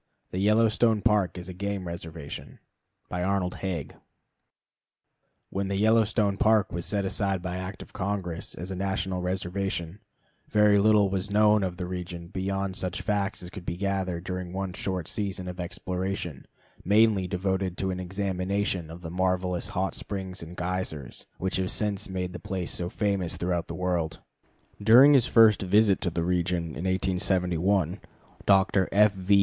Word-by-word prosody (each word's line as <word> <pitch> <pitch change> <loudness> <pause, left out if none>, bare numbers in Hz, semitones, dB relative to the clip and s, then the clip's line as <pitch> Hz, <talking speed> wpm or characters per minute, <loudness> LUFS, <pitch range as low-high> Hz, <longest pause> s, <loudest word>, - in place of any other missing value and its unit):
_ - - -43
The 90 - -2
Yellowstone 110 +1 +3
Park 105 -5 +2
as 90 0 -7
a 95 - -6
Game 100 0 -3
Reservation 80 -3 -7 0.5
When 90 -3 -1 1.8
the 100 - -1
Yellowstone 105 -1 +3
Park 110 -1 +3
was 85 0 -3
set 100 -2 0
aside 95 -2 -1
by 90 0 -3
Act 95 +2 -6
of - - -18
Congress 95 -3 -3
as 90 +2 -6
a - - -3
national 95 -1 -1
reservation, 90 0 -3 0.5
very 105 -1 +5
little 105 -1 +4
was 95 +1 -1
known 105 +1 +4
of 90 -2 -2
the 90 - -3
region 90 -1 -6
beyond 95 0 -2
such 95 +1 -2
facts 100 0 -1
as 90 - -8
could 100 - -8
be 85 - -4
gathered 95 -3 -1
during 90 -1 -4
one 95 -1 -3
short 90 -3 -3
season 95 -3 -3
of 90 0 -6
exploration, 90 -3 -4 0.4
mainly 105 -1 +4
devoted 95 -1 -1
to 95 -1 -1
an 90 - -4
examination 95 -1 -2
of 85 +2 -9
the 80 -2 -6
marvelous 90 0 0
hot 95 +1 -1
springs 95 -2 -5
and 85 +1 -9
geysers, 90 -7 -4
which 95 0 -1
have 95 -1 -1
since 105 -3 0
made 90 -1 -3
the 90 - -6
place 95 -4 -4
so 85 0 -3
famous 100 -4 -1
throughout 85 -1 -1
the - - -5
world. 90 -3 -1 0.6
During 125 +7 +8
his 130 -3 +5
first 110 -2 +6
visit 100 +1 +4
to 90 - 0
the 85 0 -2
region 90 -1 0
in 80 +3 -6
1871, 95 -1 +1 0.5
Dr. 95 -1 +4
F. 105 +1 +5
V. 95 +1 +3
95 Hz, 160 wpm, -27 LUFS, 90-100 Hz, 1.8 s, During